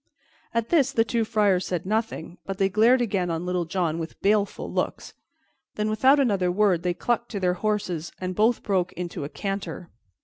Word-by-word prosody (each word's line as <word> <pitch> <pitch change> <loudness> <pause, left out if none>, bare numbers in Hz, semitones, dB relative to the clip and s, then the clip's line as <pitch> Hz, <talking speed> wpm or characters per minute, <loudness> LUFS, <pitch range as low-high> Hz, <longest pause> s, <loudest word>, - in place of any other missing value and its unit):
At 230 0 -1
this 280 -6 +3
the 225 - +3
two 230 +1 0
friars 210 -4 +2
said 180 -2 -2
nothing, 210 -5 -2
but 195 -1 -5
they 195 0 +2
glared 230 +6 +4
again 195 -6 0
on 165 +1 -2
Little 180 -1 -1
John 165 -1 -1
with 165 0 -7
baleful 205 0 0
looks; - - -3 0.6
then, 215 0 -1
without 265 +6 +4
another 200 -9 +2
word, 190 -3 +2
they 180 0 -1
clucked 240 +5 -1
to 200 - -2
their 180 -1 +2
horses, 180 -4 -2
and 185 0 -3
both 220 +5 +2
broke 190 -3 0
into 175 -5 -5
a - - -6
canter. 195 -3 -5
195 Hz, 190 wpm, -25 LUFS, 180-220 Hz, 0.6 s, glared